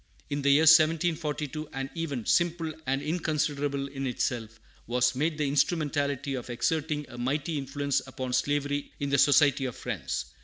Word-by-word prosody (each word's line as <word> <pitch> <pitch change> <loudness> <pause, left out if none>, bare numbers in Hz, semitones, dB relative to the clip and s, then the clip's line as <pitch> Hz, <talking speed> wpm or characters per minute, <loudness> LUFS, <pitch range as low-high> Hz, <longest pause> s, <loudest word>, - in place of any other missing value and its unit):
In 145 0 -1
the 140 - +2
year 140 +2 +6
1742 155 -2 +3
an 135 0 -4
event, 145 -9 -3
simple 170 -2 +1
and 135 +1 0
inconsiderable 145 -4 -1
in 135 -1 -4
itself, 115 -3 -2 0.3
was 125 +1 +2
made 155 +4 -1
the 150 -2 0
instrumentality 140 -2 0
of 125 -2 -5
exerting 150 +4 -1
a 120 - -10
mighty 145 +6 -1
influence 140 +1 -1
upon 130 -1 -5
slavery 145 +2 0
in 140 -1 -2
the 140 - +3
Society 140 -1 +5
of 125 - -4
Friends. - - -3
145 Hz, 155 wpm, -28 LUFS, 135-155 Hz, 0.3 s, year